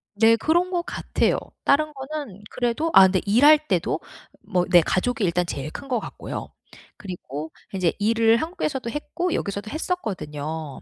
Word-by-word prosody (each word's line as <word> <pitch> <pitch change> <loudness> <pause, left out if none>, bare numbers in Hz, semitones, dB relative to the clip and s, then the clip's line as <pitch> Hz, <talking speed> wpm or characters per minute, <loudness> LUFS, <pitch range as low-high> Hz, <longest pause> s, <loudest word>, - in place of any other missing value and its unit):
네. 225 +2 +5
그런 335 +10 +1
것 355 -2 0
같아요. - - 0 0.3
다른 305 +2 +2
거는 270 -7 -7
그래도 250 +7 -1
아 190 - +9
근데 185 0 +3
일할 275 +9 +7
때도 - - 0 0.4
뭐 180 -3 0
내 175 - +7
가족이 225 +8 0
일단 180 -1 +1
제일 150 -2 -5
큰 275 - -8
거 250 -3 0
같고요. - - -7 0.5
그리고 160 -5 -7 0.2
인제 185 -4 +1
일을 225 +2 +3
한국에서도 305 -5 -3
했고 345 +6 -3
여기서도 200 +1 -3
했었거든요. 160 - -4
225 Hz, 320 characters per minute, -24 LUFS, 180-295 Hz, 0.5 s, 아